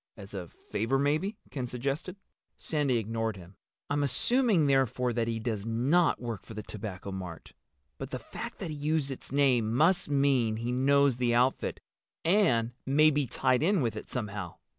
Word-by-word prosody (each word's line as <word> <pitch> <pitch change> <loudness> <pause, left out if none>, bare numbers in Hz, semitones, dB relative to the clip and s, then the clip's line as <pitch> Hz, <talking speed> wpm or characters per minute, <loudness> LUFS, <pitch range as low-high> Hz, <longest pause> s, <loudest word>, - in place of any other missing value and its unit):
"As 100 -1 -10
a 95 -3 -5
favor, 115 +10 -2
maybe," 155 +10 0
Ken 130 -4 -3
suggested. 140 +9 -3 0.4
Sandy 145 -5 0
ignored 115 -1 -2
him. 90 +1 -13 0.3
"I'm 145 +1 0
assuming, 185 - +3
therefore, 130 -3 +2
that 115 -1 0
he 115 -1 -1
does 110 -3 -3
not 130 +10 +2
work 115 -5 -5
for 110 - -11
the 105 - -5
Tobacco 100 -3 -6
Mart. 90 -5 -7 0.5
But - - -5
the - - -3
fact - - -8
that 160 - -5
he - - -5
used 150 -1 0
its 130 - -7
name 130 -6 +3
must 165 +8 +3
mean 135 -6 +2
he 115 +2 -3
knows 140 0 +3
the 120 -1 +1
outfit—and 130 - 0
may 150 +3 +4
be 145 -2 0
tied 125 +2 +1
in 180 -1 +2
with 115 - -1
it - - -8
somehow. 105 -7 -4
125 Hz, 170 wpm, -29 LUFS, 115-145 Hz, 0.5 s, may